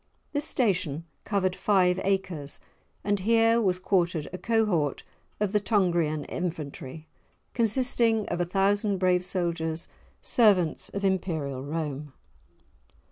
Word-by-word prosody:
This 290 0 -1
station 180 - 0 0.2
covered 190 -3 0
five 185 -3 +2
acres, 185 -7 -1 0.4
and 205 0 +1
here 225 +3 +3
was 185 -4 +2
quartered 175 -4 0
a 185 - -5
cohort 210 - +1 0.4
of 210 -2 0
the 210 - +3
Tungrian 175 -8 +1
infantry, 155 -3 -5 0.5
consisting 230 -1 +2
of 175 0 -1
a - - +1
thousand 200 +2 +1
brave 180 -1 +2
soldiers, 170 -3 -2 0.4
servants 195 -9 +3
of 200 0 -3
Imperial 160 -8 -1
Rome. 150 -1 -4
185 Hz, 115 wpm, -27 LUFS, 160-205 Hz, 0.5 s, here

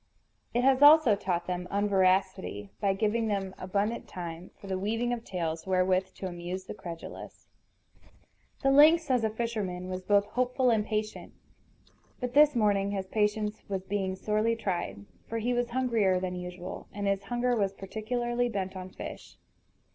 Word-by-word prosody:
It 245 - +1
has 265 0 +4
also 290 -6 +8
taught 175 -3 -2
them 180 0 -3
unveracity, 190 - +1
by 195 - +2
giving 220 +2 0
them 195 -2 -2
abundant 200 +5 -1
time 170 0 -7
for - - -13
the 190 -1 -2
weaving 225 +5 -1
of 235 -1 -4
tales 165 -3 -4
wherewith 185 0 +1
to - - -7
amuse 175 +1 -5
the - - -7
credulous. 170 -5 -9 1.1
The 270 - +4
lynx, 305 +2 +6
as 250 -3 +2
a 220 - +2
fisherman, 210 -5 -3
was 185 0 -4
both 200 +1 +3
hopeful 250 +3 +1
and 220 -2 +2
patient. 215 0 -4 0.9
But 250 -1 -3
this 295 -1 +6
morning 205 -3 +2
his 195 -1 -2
patience 210 +1 0
was 190 -2 -2
being 190 -1 -2
sorely 215 +4 0
tried; 180 - -3 0.2
for 230 - -3
he 235 +2 0
was 245 0 0
hungrier 230 -7 +2
than 185 0 -3
usual, 180 0 -7
and 205 0 -4
his 195 0 0
hunger 245 +3 0
was 200 -4 +1
particularly 240 +5 -2
bent 190 -3 -3
on 185 0 -6
fish. - - -9
205 Hz, 160 wpm, -29 LUFS, 185-235 Hz, 1.1 s, also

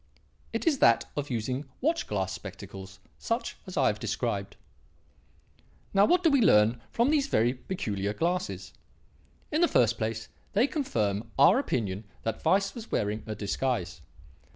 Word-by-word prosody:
It - - -3
is 310 -5 +2
that 115 -1 +5
of 145 -1 -3
using 125 +4 -2
watch 320 +5 0
glass 95 -2 -1
spectacles 95 0 -9 0.2
such 230 +2 -2
as - - -7
I - - +4
have - - +1
described. - - -2 1.4
"Now, 200 0 +6
what 360 +9 +3
do 325 - +5
we 280 -3 +4
learn 115 - +4
from 240 +5 +2
these 290 -3 +2
very 120 - +2
peculiar 105 - -3
glasses? 175 +11 -2 0.8
In 310 +2 +1
the 345 - +6
first 115 - +3
place 110 0 -2 0.3
they 215 +5 +4
confirm 110 - -1
our 140 - +6
opinion 105 - -2 0.2
that 115 - -3
Weiss 195 +1 +2
was 230 -1 -9
wearing 105 +1 0
a 110 - -3
disguise. 100 -4 -2
120 Hz, 150 wpm, -28 LUFS, -, 1.4 s, Now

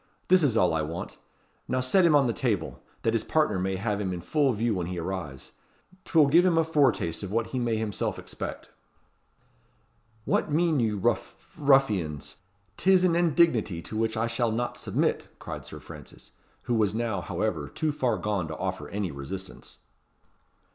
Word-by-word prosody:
"This 185 0 +6
is 130 -7 +2
all 90 -5 +3
I 80 - +1
want. 80 +4 -6 0.5
Now 130 - 0
set 150 +9 +3
him 160 -3 +5
on 140 -2 +5
the 120 - 0
table, 105 -11 -2 0.2
that 115 - +1
his 115 - +1
partner 150 -12 +1
may 95 +1 -1
have 105 +1 -2
him 95 -2 -2
in 90 - -4
full 140 - +1
view 115 0 0
when 90 -3 -2
he 90 0 -4
arrives. 85 -6 -5 0.5
'Twill 160 -3 +5
give 165 +6 +5
him 180 -3 +3
a 165 - +5
foretaste 140 - +1
of 100 -2 -6
what 115 +1 -1
he 130 - -1
may 120 -2 0
himself 110 -3 -2
expect." - - -7 1.5
"What - - 0
mean 160 -1 +2
you, 110 -3 +1
ruff 95 - -2
ruffians? 105 - +1 0.4
'Tis 185 -1 +4
an 175 -2 +3
indignity 160 - +2
to 110 - -8
which 110 0 0
I 115 - +1
shall 115 0 0
not 120 +2 -2
submit," - - -1
cried - - -7
Sir - - -8
Francis, - - -12 0.3
who 120 - -1
was 110 -2 +2
now, 110 -5 -1
however, - - -2
too 155 -1 -1
far 130 -4 0
gone 100 -6 -1
to 80 - -6
offer 95 0 -4
any 100 -4 -3
resistance. 80 +8 -8
115 Hz, 180 wpm, -27 LUFS, 95-140 Hz, 1.5 s, This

